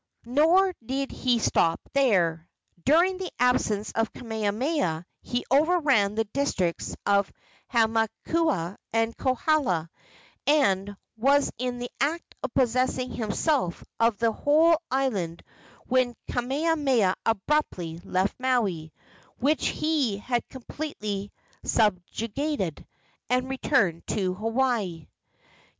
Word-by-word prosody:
Nor 330 Hz, +9 st, +4 dB
did 270 Hz, +3 st, -2 dB
he 250 Hz, -2 st, +1 dB
stop 165 Hz, -6 st, +2 dB
there. 175 Hz, -, +2 dB, 0.4 s
During 350 Hz, +6 st, +4 dB
the 375 Hz, -, -4 dB
absence 220 Hz, -4 st, +1 dB
of 225 Hz, 0 st, -1 dB
Kamehameha 220 Hz, -, -1 dB, 0.2 s
he 245 Hz, 0 st, -3 dB
overran 280 Hz, -, +3 dB
the 225 Hz, -, +2 dB
districts 205 Hz, -7 st, -2 dB
of 200 Hz, -1 st, +2 dB, 0.4 s
Hamakua 225 Hz, -, +1 dB
and 225 Hz, 0 st, 0 dB
Kohala, 255 Hz, -, +1 dB, 0.6 s
and 205 Hz, -9 st, +2 dB, 0.2 s
was 275 Hz, +5 st, +3 dB
in 250 Hz, -1 st, -2 dB
the 245 Hz, 0 st, -5 dB
act 305 Hz, +6 st, -1 dB
of -, -, -3 dB
possessing 255 Hz, 0 st, +1 dB
himself 225 Hz, -, -1 dB, 0.2 s
of 230 Hz, -2 st, +3 dB
the 230 Hz, +1 st, +2 dB
whole 315 Hz, +6 st, +3 dB
island 205 Hz, -11 st, -1 dB, 0.4 s
when 250 Hz, -1 st, +1 dB, 0.2 s
Kamehameha 265 Hz, -, +1 dB
abruptly 195 Hz, -, -1 dB
left 190 Hz, +2 st, -1 dB
Maui, 210 Hz, -12 st, 0 dB, 0.5 s
which 295 Hz, +5 st, +1 dB
he 295 Hz, -10 st, 0 dB
had 240 Hz, +3 st, -2 dB
completely 215 Hz, -7 st, -5 dB, 0.3 s
subjugated, 215 Hz, -, -1 dB, 0.4 s
and 250 Hz, +1 st, +1 dB
returned 225 Hz, -, +1 dB
to 185 Hz, -3 st, 0 dB
Hawaii. 220 Hz, -, -1 dB
240 Hz, 100 wpm, -26 LUFS, 200-280 Hz, 0.6 s, Nor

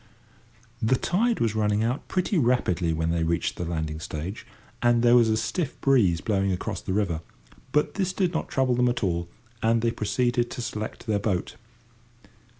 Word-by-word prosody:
The 110 Hz, +4 st, +3 dB
tide 225 Hz, -, +1 dB
was 115 Hz, -2 st, +1 dB
running 105 Hz, 0 st, +1 dB
out 120 Hz, +4 st, -2 dB
pretty 185 Hz, +2 st, 0 dB
rapidly 115 Hz, -, +2 dB
when 80 Hz, +1 st, 0 dB
they 85 Hz, -1 st, 0 dB
reached 85 Hz, +1 st, 0 dB
the 90 Hz, -, -3 dB
landing 80 Hz, -2 st, -3 dB
stage, 80 Hz, +6 st, -6 dB, 0.3 s
and 120 Hz, -1 st, +3 dB
there 120 Hz, 0 st, +6 dB
was 120 Hz, -2 st, +5 dB
a 110 Hz, -, +2 dB
stiff 120 Hz, +7 st, -2 dB
breeze 110 Hz, -12 st, +3 dB
blowing 100 Hz, -3 st, +1 dB
across 90 Hz, -, -3 dB
the -, -, -5 dB
river, 95 Hz, -5 st, 0 dB, 0.5 s
but 150 Hz, +1 st, +1 dB
this 190 Hz, -2 st, 0 dB
did 185 Hz, -2 st, 0 dB
not 160 Hz, -, -2 dB
trouble 130 Hz, -2 st, +1 dB
them 125 Hz, 0 st, +3 dB
at 120 Hz, -1 st, -2 dB
all, 85 Hz, -2 st, -1 dB, 0.3 s
and 115 Hz, +1 st, +2 dB
they 115 Hz, -, +2 dB
proceeded 120 Hz, +2 st, 0 dB
to 125 Hz, -, -5 dB
select 110 Hz, -1 st, -5 dB
their 105 Hz, -3 st, +1 dB
boat. 95 Hz, -3 st, -2 dB
110 Hz, 180 wpm, -26 LUFS, 90-125 Hz, 0.5 s, there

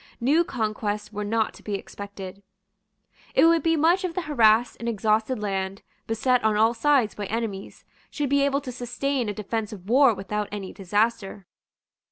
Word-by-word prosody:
New 290 Hz, +8 st, +3 dB
conquests 215 Hz, -5 st, -3 dB
were 210 Hz, 0 st, -3 dB
not 220 Hz, +1 st, 0 dB
to -, -, -15 dB
be 205 Hz, -, -3 dB
expected. 200 Hz, -1 st, -8 dB, 0.9 s
It -, -, +6 dB
would 335 Hz, 0 st, +5 dB
be 330 Hz, 0 st, +2 dB
much 335 Hz, +5 st, +3 dB
if 360 Hz, -2 st, -3 dB
the 365 Hz, -, -2 dB
harassed 235 Hz, -5 st, +3 dB
and 235 Hz, -, -2 dB
exhausted 220 Hz, +3 st, +1 dB
land, 195 Hz, -1 st, -3 dB, 0.2 s
beset 245 Hz, +2 st, +1 dB
on 215 Hz, -1 st, +2 dB
all 225 Hz, +2 st, +4 dB
sides 255 Hz, -2 st, +2 dB
by 205 Hz, -1 st, -5 dB
enemies, 215 Hz, -3 st, -5 dB, 0.2 s
should 295 Hz, -2 st, -2 dB
be 280 Hz, 0 st, +4 dB
able 280 Hz, 0 st, +1 dB
to 260 Hz, -, -6 dB
sustain 245 Hz, 0 st, -2 dB
a -, -, -2 dB
defensive 210 Hz, -2 st, -4 dB
war 250 Hz, 0 st, +5 dB
without 205 Hz, +1 st, -3 dB
any 200 Hz, -2 st, -6 dB
disaster. 205 Hz, 0 st, -1 dB
220 Hz, 170 wpm, -25 LUFS, 205-260 Hz, 0.9 s, It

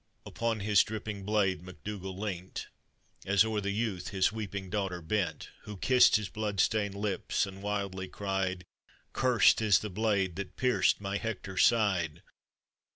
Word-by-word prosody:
Upon 115 Hz, -2 st, -2 dB
his 105 Hz, -1 st, +4 dB
dripping 105 Hz, -2 st, -6 dB
blade 100 Hz, -5 st, +1 dB
MacDougall 95 Hz, +2 st, -7 dB
leant, 95 Hz, -3 st, -5 dB, 0.5 s
As 100 Hz, +2 st, +4 dB
o'er 110 Hz, -2 st, -1 dB
the 100 Hz, -, -2 dB
youth 100 Hz, -3 st, -2 dB
his 95 Hz, -1 st, +1 dB
weeping 100 Hz, -3 st, -5 dB
daughter 95 Hz, -4 st, -2 dB
bent, 95 Hz, +4 st, -2 dB, 0.2 s
Who 105 Hz, -1 st, -7 dB
kissed 125 Hz, +6 st, +5 dB
his 105 Hz, -2 st, +1 dB
blood 105 Hz, +1 st, -3 dB
stained 100 Hz, +1 st, +1 dB
lips, 100 Hz, -2 st, -1 dB
and 95 Hz, 0 st, -10 dB
wildly 100 Hz, -2 st, -3 dB
cried, 95 Hz, -2 st, -2 dB, 0.2 s
" -, -, -32 dB
Cursed 120 Hz, -4 st, +4 dB
is 105 Hz, -4 st, +5 dB
the 105 Hz, -, -5 dB
blade 100 Hz, -3 st, 0 dB
that 100 Hz, -1 st, -6 dB
pierced 125 Hz, -4 st, +2 dB
my 100 Hz, 0 st, -2 dB
Hector's 100 Hz, -4 st, -1 dB
side!" 95 Hz, -9 st, 0 dB
100 Hz, 155 wpm, -30 LUFS, 95-105 Hz, 0.5 s, kissed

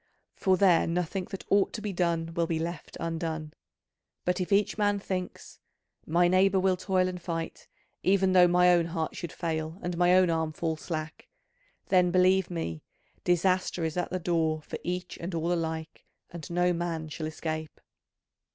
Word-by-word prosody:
For 190 Hz, -1 st, +2 dB
there 180 Hz, -3 st, +4 dB
nothing 180 Hz, +2 st, -1 dB
that 195 Hz, -, -7 dB
ought 200 Hz, -1 st, +3 dB
to -, -, -4 dB
be 210 Hz, -2 st, -3 dB
done 170 Hz, -2 st, 0 dB
will 170 Hz, 0 st, 0 dB
be 165 Hz, -, -1 dB
left 165 Hz, -1 st, -5 dB
undone. 160 Hz, -2 st, -3 dB, 0.7 s
But 180 Hz, +1 st, 0 dB
if 180 Hz, -, -3 dB
each 200 Hz, +1 st, +3 dB
man 205 Hz, -1 st, +2 dB
thinks 185 Hz, -2 st, -5 dB, 0.5 s
'My 175 Hz, +2 st, +4 dB
neighbour 190 Hz, +1 st, +4 dB
will 185 Hz, 0 st, +3 dB
toil 185 Hz, 0 st, +1 dB
and 180 Hz, -1 st, -5 dB
fight, 165 Hz, -2 st, -5 dB, 0.3 s
even 190 Hz, 0 st, +3 dB
though 180 Hz, -1 st, +7 dB
my 180 Hz, 0 st, +5 dB
own 170 Hz, -1 st, +3 dB
heart 165 Hz, -2 st, -3 dB
should 170 Hz, -4 st, -5 dB
fail 160 Hz, -1 st, -3 dB
and 175 Hz, 0 st, -2 dB
my 180 Hz, 0 st, +5 dB
own 185 Hz, -2 st, +5 dB
arm 160 Hz, -1 st, -1 dB
fall 165 Hz, -2 st, -2 dB
slack,' 155 Hz, 0 st, -6 dB, 0.6 s
then, 180 Hz, -2 st, +4 dB
believe 185 Hz, +1 st, +3 dB
me, 85 Hz, -, -4 dB, 0.4 s
disaster 180 Hz, -1 st, +1 dB
is 160 Hz, -, -3 dB
at 180 Hz, -, -1 dB
the 185 Hz, -, -2 dB
door 160 Hz, -3 st, 0 dB
for -, -, -6 dB
each 180 Hz, 0 st, -4 dB
and 170 Hz, +1 st, -4 dB
all 165 Hz, +2 st, 0 dB
alike, 160 Hz, -2 st, -4 dB, 0.3 s
and 170 Hz, -3 st, -8 dB
no 175 Hz, +1 st, +2 dB
man 165 Hz, -2 st, -3 dB
shall 155 Hz, +1 st, -5 dB
escape. 155 Hz, 0 st, -5 dB
175 Hz, 175 wpm, -28 LUFS, 165-185 Hz, 0.7 s, though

